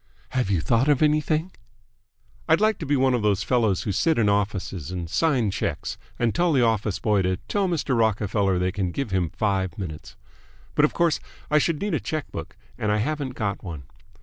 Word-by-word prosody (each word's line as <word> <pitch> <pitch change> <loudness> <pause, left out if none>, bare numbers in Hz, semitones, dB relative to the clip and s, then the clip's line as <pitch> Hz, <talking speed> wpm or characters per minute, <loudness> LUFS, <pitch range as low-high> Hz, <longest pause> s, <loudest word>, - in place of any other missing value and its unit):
"Have 125 -5 -1
you 95 -5 +2
thought 115 - +2
of 145 0 +4
anything?" 155 +3 +1 1.0
"I'd - - +5
like 215 +1 +2
to 155 - -5
be 145 0 +2
one 130 0 +3
of 120 - +1
those 100 -2 +1
fellows 115 -7 +1
who 105 - -1
sit 160 - +2
in 110 -3 +3
offices, 100 -5 -1
and 90 -2 -4
sign 125 - +1
checks, - - -3 0.2
and 120 -2 +1
tell 175 0 +2
the 130 -3 +4
office 110 -3 +1
boy 105 -3 +2
to 90 0 0
tell 200 -2 +1
Mr. 160 -7 0
Rockerfeller 105 -3 +1
they 90 +1 0
can 95 -1 -1
give 115 +4 -3
him 90 -3 +1
five 95 -2 -1
minutes. 80 -6 -7 0.6
But 150 - +4
of - - -1
course 170 -3 +2 0.3
I 150 - +5
should 155 0 0
need 205 -2 -2
a - - +1
check 155 -2 -4
book, - - -7 0.2
and 105 - 0
I 105 - +2
haven't 135 +2 -2
got 100 -3 -2
one. 80 -7 -6
110 Hz, 205 wpm, -24 LUFS, 95-150 Hz, 1.0 s, I'd